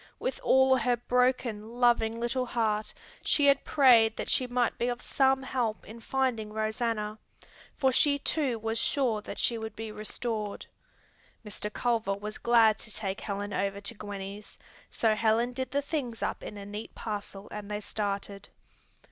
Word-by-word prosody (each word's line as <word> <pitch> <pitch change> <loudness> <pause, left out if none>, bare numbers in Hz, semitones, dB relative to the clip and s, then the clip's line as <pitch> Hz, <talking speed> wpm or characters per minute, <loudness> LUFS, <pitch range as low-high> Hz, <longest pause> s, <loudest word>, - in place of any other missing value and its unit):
With - - -3
all 265 - +5
her 245 0 +1
broken, 245 -2 0
loving 230 -2 +3
little 250 +2 -1
heart 215 -3 0 0.3
she 290 - +3
had 280 0 +5
prayed 235 -6 +5
that - - -3
she 255 - +2
might 245 -1 +1
be 240 - +1
of 245 0 -2
some 265 0 +2
help 245 -4 -2
in 225 +2 -10
finding 230 -3 -1
Rosanna, 215 0 -2 0.6
for 265 -2 +3
she 285 +2 +4
too 280 -4 0
was 225 +1 -2
sure 235 -4 +1
that - - -8
she 230 -2 +1
would 220 0 -6
be 220 -1 -6
restored. 215 0 -4 0.8
Mr. 210 0 -4
Culver 225 -4 0
was 210 +2 -6
glad 225 -2 +5
to - - -9
take 200 -1 -3
Helen 205 0 -4
over 200 +1 -1
to 200 +3 -4
Gwenny's, 205 -1 -8 0.3
so 225 -2 +2
Helen 225 +3 +2
did 260 0 -3
the 285 +2 0
things 270 -6 -3
up - - -2
in 210 - -7
a 200 - -7
neat 210 +2 -7
parcel 205 -2 -5
and 210 -1 -7
they 210 0 -2
started. 200 -1 -4
225 Hz, 165 wpm, -29 LUFS, 210-250 Hz, 0.8 s, all